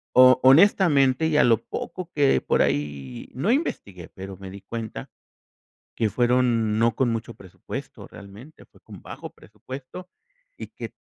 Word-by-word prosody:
o 130 0 +7
honestamente, 145 -2 +4
y 155 -2 +1
a - - +5
lo 115 -2 +4
poco 180 0 -7
que 145 -2 +2
por - - +1
ahí 70 -4 -3
no 170 - 0
investigué, 100 - -3
pero 95 0 -10
me 95 -1 -10
di 100 +1 -11
cuenta, 110 +2 -7 0.9
que 110 -3 0
fueron 120 -3 +1
no 115 0 +2
con 130 -3 +1
mucho 115 -1 -4
presupuesto 95 -1 -9
realmente, 105 +10 -14
fue - - -25
con - - -14
bajo - - -9
presupuesto, 130 - -11 0.5
y - - -8
que - - -9
120 Hz, 150 wpm, -24 LUFS, 100-140 Hz, 0.9 s, o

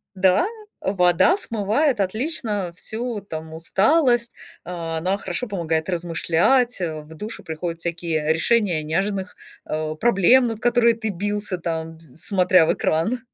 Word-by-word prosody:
Да, 190 - +3 0.3
вода 180 - +3
смывает 230 - 0
отлично 210 - -2
всю 225 +3 -4
там 160 -4 -8
усталость, 240 - +2 0.3
а, 165 -2 -4
она 185 +5 0
хорошо 195 +5 -3
помогает 165 -5 -2
размышлять, 175 +8 +1
а, 160 -3 -3
в 150 +1 -14
душе 210 +7 -7
приходят 165 +1 -5
всякие 165 -2 -1
решения 180 -1 +2
неожиданных, 190 +4 -2 0.3
а, 155 0 -3
проблем, 240 +6 +4
над 225 -2 -4
которыми 240 -1 +4
ты 225 -1 -4
бился, 205 0 -2
там, 165 -1 -4
э, - - -20
смотря 180 +4 +2
в - - +2
экран. 170 +11 0
185 Hz, 135 wpm, -22 LUFS, 165-225 Hz, 0.3 s, проблем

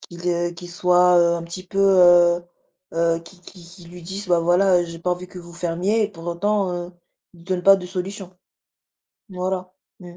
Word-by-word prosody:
qu'il, 170 0 -11
heu, 175 0 0
qu'il 175 +1 -11
soit, 180 0 +3
heu, 170 0 +3
un 165 - -6
petit 180 +2 -9
peu, 195 - -6
heu 175 -2 +5 0.5
heu 165 0 +1
qui 180 +2 -17
qui 180 0 -15
qu'il 170 0 -15
lui 175 0 -12
dise: 190 +3 -7
«Bah 175 -1 +3
voilà, 175 +1 +3
j'ai 170 -1 -9
pas 180 +2 -2
envie 180 +1 -3
que 180 - -12
vous 170 -1 -12
fermiez» 175 +6 -1
et - - -3
pour 165 -3 -12
autant, 195 +2 -1
heu, 175 0 -6 0.4
il 170 -1 -18
donne 185 -1 -2
pas 195 +1 +7
de 180 -2 -7
solution. 185 0 -6 0.9
Voilà, 185 -1 -4 0.3
mmh, 175 -1 -12
180 Hz, 200 wpm, -21 LUFS, 170-185 Hz, 0.9 s, pas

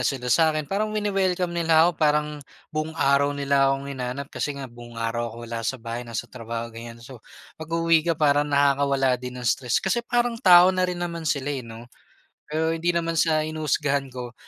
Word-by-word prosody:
sila 125 -3 0
sa'kin, 155 -2 +3
parang 215 +6 -2
wine-welcome 190 -4 0
nila 165 -1 +4
ako 175 - +4
parang 150 0 +3 0.4
buong 155 +1 -3
araw 140 0 +2
nila 140 -1 +2
akong 135 0 -1
hinanap 130 +2 -5
kasi 145 -1 -3
nga 135 - -6
buong 120 -1 -12
araw 115 +1 -2
ako 115 - -11
wala 115 0 -5
sa 115 +4 -2
bahay 120 +1 -6
nasa 115 0 -4
trabaho 115 -1 -6
ganyan. 115 0 -10
So 125 -3 -12 0.4
pag-uuwi 165 0 +2
ka 165 - +1
parang 145 -1 +2
nakakawala 140 -2 +2
din 125 0 -7
ng 125 - -7
stress 120 0 +1
kasi 190 +5 0
parang 240 -1 -1
tao 180 0 +7
na 185 0 0
rin 180 - -3
naman 170 -2 -4
sila 145 0 -1
eh, 135 - -3
no? 115 -1 -10 0.7
Pero 160 +1 0
hindi 165 +1 -1
naman 165 0 0
sa 155 -2 +2
hinuhusgahan 145 -3 -1
ko, 125 -1 -7
140 Hz, 190 wpm, -24 LUFS, 125-165 Hz, 0.7 s, tao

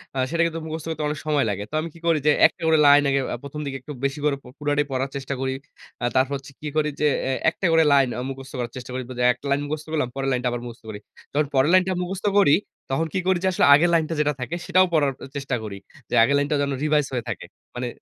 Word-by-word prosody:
আ - - -4
সেটা 170 +1 0
কিন্তু 165 0 -2
মুখস্থ 160 0 -5
করতে 155 -1 -3
অনেক 150 0 -3
সময় 150 -4 +2
লাগে। 100 0 -3
তো - - -19
আমি 165 - -5
কি 165 - -15
করি 165 -2 +3
যে - - +7 0.2
একটা - - -18
করে 160 0 +5
লাইন 145 0 +8
আগে 140 0 +2
আ - - -1
১ম 140 +2 -7
দিকে 135 -1 -4
একটু 150 - -9
বেশি 140 +2 -2
করে 145 -2 +2 0.2
পুরটাই 145 0 +1
পড়ার 135 +1 -1
চেষ্টা 140 0 -4
করি। 130 0 -1 0.5
আ - - +2
তারপর 130 +2 +2
হচ্ছে 135 +1 -13
কি 155 - -5
করি 155 -1 +2
যে 150 - +4 0.2
এ - - +1 0.2
একটা 180 - -5
করে 165 0 +5
লাইন 135 -2 +5
আ - - -2
মুখস্থ 135 0 -8
করার 120 -1 -3
চেষ্টা 125 -1 -8
করি। 130 - -2 0.3
একটা - - -17
লাইন 140 +1 +2
মুখস্থ 150 +1 -4
করলাম 150 -6 0
পরের 135 0 -1
লাইনটা 125 -1 0
আবার 120 0 -3
মুখস্থ 120 0 -10
করি। 105 -1 -6 0.3
তখন 150 +1 +2
পরের 135 +3 +4
লাইনটা 185 0 +4
মুখস্থ 190 +2 -5
করি 145 -7 +6 0.4
তখন 160 +5 0
কি 190 - +1
করি 190 -1 +3
যে - - +2
আসলে 160 - +3
আগের 165 +5 +5
লাইন 165 -1 +4 0.2
যেটা 150 0 +1
থাকে 155 +7 -3
সেটাও 185 0 +4
পড়ার 145 -4 +3 0.2
চেষ্টা 135 -2 -2
করি। 100 -2 -6 0.3
যে - - -7
আগের 140 +5 +3
লাইনটা 145 +1 0
যেন 140 0 0
রিভাইজ 150 -1 +2
হয়ে 120 -2 -1
থাকে। - - -5 0.3
মানে 125 0 -3
145 Hz, 255 wpm, -23 LUFS, 135-155 Hz, 0.5 s, লাইন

